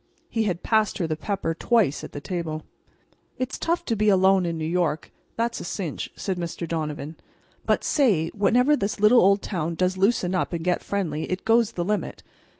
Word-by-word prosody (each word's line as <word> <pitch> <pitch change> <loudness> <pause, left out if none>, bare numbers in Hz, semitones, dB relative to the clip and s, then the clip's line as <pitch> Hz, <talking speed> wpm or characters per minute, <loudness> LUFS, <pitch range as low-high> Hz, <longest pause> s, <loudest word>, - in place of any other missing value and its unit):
He 225 -1 0
had 180 -4 -2
passed 220 -2 +2
her 180 - -1
the 160 -1 -1
pepper 190 -1 -2
twice 205 - +1
at - - -8
the - - -6
table. 160 -2 -4 0.7
"It's 255 +1 -3
tough 345 +1 -1
to 230 - 0
be 215 0 +2
alone 190 -1 +4
in 165 -1 -2
New 160 - -3
York—that's 175 +7 -2
a - - -6
cinch," 175 -3 -4
said 190 -3 -3
Mr. 170 0 -4
Donovan. 155 -1 -4 0.5
"But, - - +2
say—whenever 235 - +3
this 200 -5 -2
little 215 +4 +6
old 195 +2 +4
town 170 -4 -2
does 185 +2 0
loosen 190 -3 +2
up 185 - -1
and 165 0 -3
get 180 -1 +1
friendly 165 -6 -3
it 185 +1 -3
goes 230 0 +3
the 175 -4 -2
limit. 210 +2 -2
185 Hz, 185 wpm, -25 LUFS, 165-215 Hz, 0.7 s, little